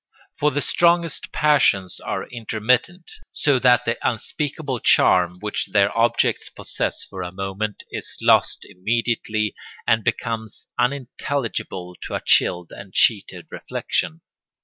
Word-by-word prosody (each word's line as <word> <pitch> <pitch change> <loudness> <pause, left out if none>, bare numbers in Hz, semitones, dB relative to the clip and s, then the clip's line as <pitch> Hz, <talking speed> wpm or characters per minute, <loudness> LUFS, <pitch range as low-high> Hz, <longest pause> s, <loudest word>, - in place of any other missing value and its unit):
For 150 - +3
the 145 0 -1
strongest 170 -2 +2
passions 135 -11 +2
are - - -4
intermittent, 120 - -1 0.2
so 140 -3 +2
that 125 -1 +4
the 115 - -1
unspeakable 135 +3 -2
charm 90 -4 +4
which 105 0 -3
their 100 0 +3
objects 115 +1 +1
possess - - -3
for 95 -2 -8
a 90 0 -5
moment 95 +2 -4
is - - -6
lost - - +3
immediately 110 +1 -1 0.3
and 115 -1 +2
becomes 110 -1 -3
unintelligible 125 -7 -2
to - - -4
a - - -2
chilled 90 -1 +3
and 100 -1 -11
cheated 105 -4 +2
reflection. 80 - -3
115 Hz, 125 wpm, -22 LUFS, 100-130 Hz, 0.3 s, that